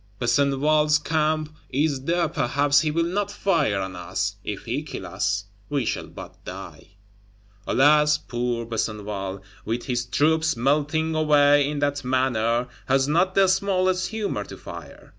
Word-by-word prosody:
Besenval's 145 +4 +3
Camp 155 0 -1
is 140 -1 0
there; 170 +1 +1
perhaps 140 +2 +2
he 155 - 0
will 165 +2 +1
not 195 +4 -1
fire 150 - +1
on 95 -1 -4
us; 95 +3 -3
if 105 -2 -5
he 125 +5 -2
kill 155 - -7
us, 100 +2 -1 0.2
we 140 -4 0
shall - - -2
but - - -12
die. 100 - -10 0.7
Alas! 150 +2 +4
poor 120 -2 -3
Besenval, 105 -4 -4 0.2
with 115 +3 -3
his 125 -2 -2
troops 160 +3 +2
melting 150 +5 +1
away 145 -2 +4
in 150 - -3
that 145 0 -1
manner, 125 -2 +1 0.2
has 135 +1 +2
not 175 +5 +2
the 195 -1 +5
smallest 185 -1 +1
humor 220 -2 -3
to - - -10
fire! - - -11
145 Hz, 145 wpm, -24 LUFS, 120-155 Hz, 0.7 s, the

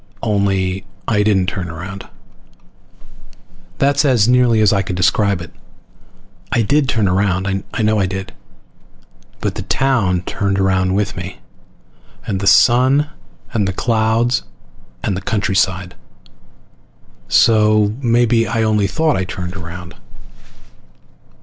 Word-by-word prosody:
Only 95 -3 0 0.2
I 105 -3 +2
didn't 100 -3 +2
turn 90 -1 -4
around. 95 +5 -8 1.7
That's 140 +1 +2
as 125 -7 +3
nearly 125 -2 +3
as 105 -1 +4
I 100 - +2
can 95 -1 -4
describe 95 +1 +1
it. 85 - -10 1.0
I 115 - +2
did 140 +5 +1
turn 110 -4 +1
around. 95 0 0 0.3
I - - -3
know 110 0 +2
I 95 - +1
did. 95 0 -6 1.1
But - - -1
the - - -5
town 115 -10 +1
turned 100 +1 -2
around 95 -1 +1
with 100 -1 -1
me, 90 +1 -7 0.9
and 95 -2 -2
the 100 - -2
sun 130 +8 +4 0.4
and 105 -5 0
the 95 - -2
clouds 115 +3 +1 0.6
and 100 - -1
the 95 - -4
countryside. 95 -3 -1 1.3
So 105 - +3
maybe 120 -2 +2
I 115 - 0
only 105 -2 +1
thought 160 +8 0
I 95 - -1
turned 90 0 -6
around. 85 0 -8
100 Hz, 125 wpm, -17 LUFS, 95-115 Hz, 1.7 s, as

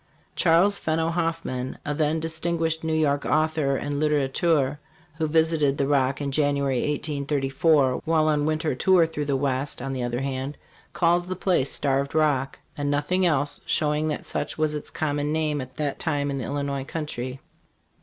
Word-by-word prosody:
Chas. 180 +4 +4
Fenno 160 +1 0
Hoffman, 165 -7 -2
a 150 - -1
then 155 +1 +1
distinguished 165 0 -1
New 160 - -1
York 145 -2 +1
author 155 -3 +1
and 145 +1 -3
litterateur, 145 0 +1 0.4
who 160 - +1
visited 160 -3 +2
the 140 - +1
Rock 135 -1 +1
in 140 -1 -2
January, 140 -2 +1
1834, 145 -1 +1
while 160 -1 +2
on 150 -1 +2
a - - 0
winter 155 0 0
tour 180 +6 +4
through 150 -2 -4
the 140 -1 0
West, 135 0 -1
on 135 +2 -4
the 130 - -3
other 120 +1 -2
hand, 135 +1 -3 0.3
calls 175 +1 +2
the 185 - -3
place 180 -7 +1
"Starved 140 0 0
Rock" 145 -4 +1 0.2
and 145 -1 -2
nothing 160 +6 +1
else, 145 -2 0
showing 150 0 +1
that 150 - -3
such 145 - -3
was 155 -1 +1
its 150 - -5
common 145 -1 -1
name 155 -2 0
at 130 0 -10
that 145 -2 -2
time 145 -3 -1
in 140 - -3
the 125 - -4
Illinois 140 -1 -2
country. 130 -4 -5
150 Hz, 175 wpm, -25 LUFS, 140-160 Hz, 0.4 s, Chas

